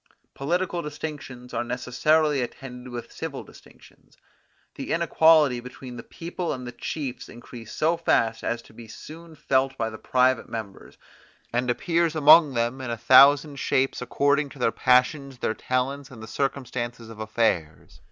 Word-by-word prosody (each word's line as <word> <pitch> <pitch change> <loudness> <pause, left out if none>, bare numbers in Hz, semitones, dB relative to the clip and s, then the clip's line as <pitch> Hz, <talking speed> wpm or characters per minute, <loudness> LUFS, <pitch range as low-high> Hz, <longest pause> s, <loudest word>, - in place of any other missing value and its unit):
Political 175 +4 -1
distinctions 145 -5 -7
are - - -1
necessarily 135 +4 +1
attended 125 0 -7
with 120 -1 -7
civil - - -6
distinctions. - - -19 0.6
The - - -4
inequality 155 -6 +4
between 125 +1 -10
the 115 - -7
people 170 +5 -5
and 125 -2 -7
the 120 - -6
chiefs 130 -2 -5
increase 120 -1 -11
so 165 +2 +1
fast 115 -8 +1
as 115 0 -2
to - - -19
be 115 0 -12
soon 160 +7 -11
felt 135 -2 0
by 115 -1 -2
the 110 - -9
private 130 0 +1
members, 110 -4 -8 0.6
and 125 +1 0
appears 165 +5 0
among 155 -2 +7
them 120 +3 -1
in 130 - -5
a 115 - -3
thousand 140 +4 +6
shapes 135 -1 0
according 145 +3 +1
to 140 - -14
their 120 -3 +1
passions, 130 +2 +2
their 110 - -1
talents, 130 +4 -2
and 115 -5 -11
the - - -8
circumstances 120 -3 -3
of 110 - -12
affairs. 110 -8 -2
130 Hz, 155 wpm, -25 LUFS, 120-150 Hz, 0.6 s, among